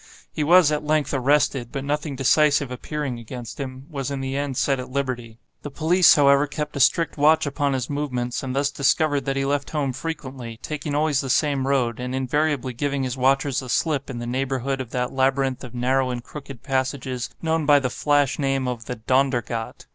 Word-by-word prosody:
He 155 - -2
was 170 0 +6
at 150 0 -1
length 150 -1 0
arrested, 135 -2 +1
but 135 -2 -4
nothing 150 0 -2
decisive 140 0 +3
appearing 130 -1 -4
against 120 +1 -8
him, 130 -1 -6
was 140 -4 -4
in 140 -1 -3
the 135 0 -3
end 140 -2 -2
set 135 -2 +1
at 125 - -6
liberty. 130 -4 -3 0.2
The 145 - -6
police, 165 +4 +5
however, 140 -1 +5
kept 150 +2 -5
a - - -2
strict 165 +5 +3
watch 155 +2 +4
upon 140 0 0
his 130 -2 -2
movements, 125 -4 -2
and 130 -1 -4
thus 140 +1 +1
discovered 140 0 +1
that 135 - -1
he 135 0 0
left 140 0 -1
home 145 -4 -1
frequently, 130 -5 -6
taking 150 -1 -4
always 150 -2 +2
the 135 - -5
same 140 -1 +1
road, 125 -4 +1
and 125 +1 -3
invariably 135 0 0
giving 140 +2 -1
his 130 -1 -2
watchers 135 +1 +2
the 130 -2 -8
slip 145 0 0
in 130 - -5
the 120 - -5
neighborhood 135 +1 -2
of 125 - -7
that 125 +1 -2
labyrinth 135 0 +1
of 125 -1 -9
narrow 130 +1 +1
and 120 -1 -4
crooked 135 -3 -10
passages 130 -2 -2
known 160 -2 0
by 145 -1 +7
the 130 -3 -1
flash 145 0 +1
name 135 -2 0
of 120 -2 -4
the 125 - -4
'Dondergat. 120 -1 -1
135 Hz, 200 wpm, -23 LUFS, 130-145 Hz, 0.2 s, by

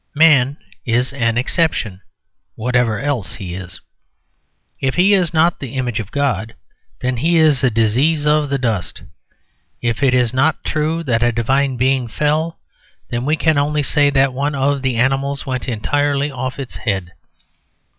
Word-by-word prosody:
Man 145 -3 +4 0.3
is 125 +3 0
an 115 -4 0
exception, 125 - 0 0.5
whatever 125 -1 0
else 135 -8 -2
he 90 -4 -7
is. 90 0 -8 1.0
If 135 -1 -1
he 190 +3 +4
is 180 -5 +2
not 170 +1 +2
the 135 -2 -7
image 125 -3 -2
of 105 -3 -6
God, 135 -5 -1 0.5
then 125 -1 -1
he 165 +7 +2
is 155 -5 +3
a 130 - +4
disease 125 +8 +1
of 150 -1 +2
the 140 - 0
dust. 115 -8 -3 0.8
If 120 0 -2
it 130 -2 +3
is 125 -2 +1
not 145 +5 +1
true 160 +2 -1
that 120 -6 0
a 120 0 +3
divine 130 +3 0
being 130 0 +1
fell, 150 +7 -1 0.5
then 120 +1 -2
we 150 +2 +2
can 155 -1 +2
only 150 +1 0
say 145 +1 +3
that 135 -1 +2
one 140 +3 -1
of 140 0 0
the 130 -2 -1
animals 135 +3 0
went 130 -1 -4
entirely 145 +5 0
off 130 0 -4
its 135 -3 -6
head. 95 -5 -3
135 Hz, 165 wpm, -18 LUFS, 120-145 Hz, 1.0 s, Man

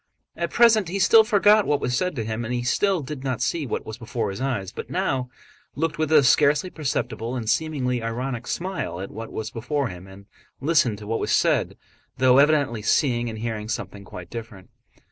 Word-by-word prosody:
At - - -2
present 225 -5 +4
he 190 - -2
still 220 +3 +6
forgot 210 0 +4
what 145 -1 +2
was 125 -2 -1
said 180 +4 -1
to 115 - -2
him 110 +1 -3
and 120 +1 -3
still 195 +1 +1
did 135 -1 -7
not 130 -3 -2
see 155 -5 -1
what - - -3
was 110 +1 -8
before 115 -3 -3
his 95 - -7
eyes, 120 -9 -2
but - - -7
he - - -14
now 130 -2 -1 0.5
looked 160 +1 -2
with 155 -1 0
a 150 -3 +6
scarcely 145 +5 +3
perceptible 125 -5 -3
and 115 -3 -4
seemingly 125 -1 0
ironic 120 +2 -4
smile 175 - -3
at 95 - -6
what 115 +1 -8
was 110 0 -5
before 130 +3 -2
him 90 +1 -10
and 95 +1 -14 0.3
listened 135 -7 +2
to 105 - -10
what 115 +2 -2
was - - -2
said, - - +2 0.4
though 130 +1 +5
evidently 140 -6 +3
seeing 120 +1 +1
and 110 - -6
hearing 110 -1 -4
something 100 -3 -5
quite 90 -2 -10
different. 110 -5 -9
125 Hz, 200 wpm, -24 LUFS, 110-150 Hz, 0.5 s, still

